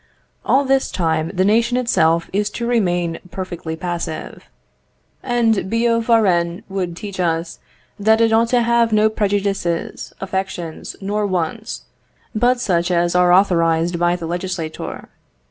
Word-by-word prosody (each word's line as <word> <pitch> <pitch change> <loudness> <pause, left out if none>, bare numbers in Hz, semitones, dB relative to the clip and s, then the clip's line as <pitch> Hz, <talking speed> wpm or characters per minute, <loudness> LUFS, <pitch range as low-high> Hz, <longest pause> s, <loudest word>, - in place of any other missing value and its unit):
All 275 +1 +3
this 270 0 +2
time 160 -2 0
the 185 -1 +1
nation 230 +4 +2
itself 170 -9 +2
is 205 +1 +1
to 235 - -2
remain 175 -8 0
perfectly 175 -3 -5
passive; 170 -1 -5 0.7
and 230 -6 +1
Billaud 230 +1 +2
Varennes 180 -7 +2
would 185 -3 -3
teach 200 -2 -7
us 165 -1 -1 0.4
that 220 +2 +4
it 225 -1 +3
ought 230 +1 +4
to 240 0 +2
have 235 -1 +2
no 215 0 +3
prejudices, 200 -5 -1
affections, 190 -4 -4
nor 205 +1 -1
wants, 185 +5 -3 0.5
but 245 +3 +2
such 175 -6 0
as 175 -1 +1
are 180 0 +4
authorised 170 -2 +3
by 175 0 +2
the 175 -2 -6
legislator. 175 -1 -5
190 Hz, 135 wpm, -19 LUFS, 170-225 Hz, 0.7 s, that